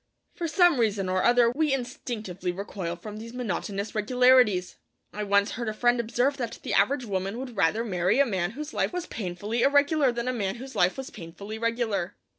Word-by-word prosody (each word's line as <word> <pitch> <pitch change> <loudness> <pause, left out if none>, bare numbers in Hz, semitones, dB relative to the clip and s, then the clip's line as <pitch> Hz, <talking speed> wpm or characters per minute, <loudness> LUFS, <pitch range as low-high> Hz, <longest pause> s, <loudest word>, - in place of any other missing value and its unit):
For 345 -5 -3
some 345 -4 +4
reason 205 -4 +1
or 185 0 +1
other 240 -1 +5
we 300 +3 +1
instinctively 235 -8 -3
recoil 180 -2 -5
from 210 +4 -9
these 230 +2 -9
monotonous 205 -3 -3
regularities. 235 -4 +3 0.4
I 210 - -4
once 200 0 +2
heard 235 -1 -3
a 215 - -5
friend 240 +1 +2
observe 245 +4 0
that 235 -4 -4
the - - -3
average 275 -2 +2
woman 195 +1 -3
would 250 -2 -6
rather 205 +5 +1
marry 185 +1 +1
a 280 - +6
man 185 -7 -1
whose 300 +4 -7
life - - 0
was 355 -1 -3
painfully 205 - -3
irregular 285 0 +4
than 235 0 -4
a 255 - 0
man 200 -4 -2
whose 265 +2 -9
life 180 +5 +2
was 265 -1 -6
painfully 200 +4 -8
regular. 230 -6 -1
230 Hz, 195 wpm, -27 LUFS, 195-255 Hz, 0.4 s, a